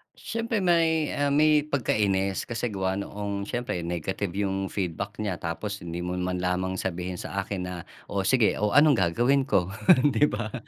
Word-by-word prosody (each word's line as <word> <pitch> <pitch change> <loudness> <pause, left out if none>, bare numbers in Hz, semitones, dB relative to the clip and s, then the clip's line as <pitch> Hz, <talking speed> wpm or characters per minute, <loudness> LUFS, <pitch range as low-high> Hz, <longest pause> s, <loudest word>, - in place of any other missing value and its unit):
Siyempre 230 -2 -2
may, 165 -3 +2
ah, 145 -1 +1
may 150 0 +4
pagkainis 100 -8 0
kasi 115 +1 -3
gawa 95 -2 -1
noong, 100 0 -4
siyempre 120 -8 -2
negative 85 +3 -3 0.2
yung 95 0 -2
feedback 100 +2 -4
nya, 100 -5 -3
tapos 100 +5 -4
hindi 85 0 -5
mo 90 - -2
man 90 0 -2
lamang 90 +1 -1
sabihin 90 0 -3
sa 100 +3 -3
akin 95 -2 -4
na, 90 - -5 0.3
"Oh, 100 -1 -2
sige 115 +2 +3
o 105 - +2
anong 150 0 +7 0.2
gagawin 125 +10 +2
ko", 95 -8 0 0.4
'di 150 - +4
ba. 110 -2 -4
100 Hz, 170 wpm, -26 LUFS, 90-130 Hz, 0.4 s, anong